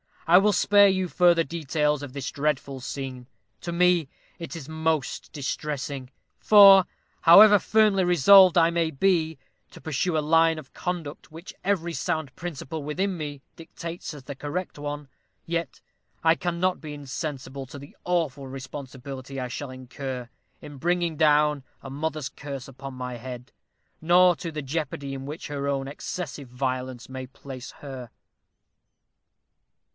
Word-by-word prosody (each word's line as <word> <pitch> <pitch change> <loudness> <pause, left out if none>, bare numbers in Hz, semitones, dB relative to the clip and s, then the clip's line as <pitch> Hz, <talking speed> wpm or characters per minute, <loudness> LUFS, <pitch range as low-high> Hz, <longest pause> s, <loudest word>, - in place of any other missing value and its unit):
I 170 +1 +7
will 210 +1 +3
spare 205 +2 +5
you 190 -1 +1
further 175 -1 +4
details 150 -2 -1
of 140 -3 -8
this 140 -1 -4
dreadful 140 -2 -2
scene. 130 -1 -6 0.3
To 170 - -5
me 175 -3 +3 0.3
it 170 +1 -7
is 160 -3 -8
most 160 -3 -2
distressing; 140 -2 -4 0.3
for, 195 -3 +8 0.4
however 205 +5 +9
firmly 210 -1 +3
resolved 180 +2 +7
I 165 -1 +6
may 165 -1 0
be 160 0 +1 0.3
to - - -13
pursue 160 +2 -1
a - - +3
line 165 +1 +3
of 150 -4 -11
conduct 170 -6 -5
which 165 +4 -10
every 180 -4 0
sound 160 -6 -2
principle 160 -2 -6
within 185 +7 -2
me 145 -4 -6 0.2
dictates 165 0 -7
as 145 -3 -11
the 140 - -7
correct 150 +4 -5
one, 145 0 -5 0.4
yet 165 -4 -3 0.4
I 160 0 +6
cannot 175 +1 -1
be 155 -2 -7
insensible 140 -1 -6
to 140 - -10
the 140 +1 -12
awful 155 -6 -1
responsibility 135 0 -8
I 125 -1 -4
shall 140 +2 -5
incur 130 -1 -7 0.3
in 145 -1 -10
bringing 170 +1 0
down 150 -2 +3 0.2
a 135 - -7
mother's 150 0 -3
curse 140 -1 -8
upon 135 +1 -9
my 125 -1 -5
head, 125 0 -9 0.5
nor 175 +2 +5
to 170 - -5
the 150 -1 -5
jeopardy 140 -1 -4
in 135 0 -6
which 150 +3 -7
her 140 -1 -3
own 135 -1 -1
excessive 145 -2 -6
violence 130 0 -4
may 130 0 -6
place 130 0 -9
her." 130 -4 -8
150 Hz, 150 wpm, -26 LUFS, 135-170 Hz, 0.5 s, however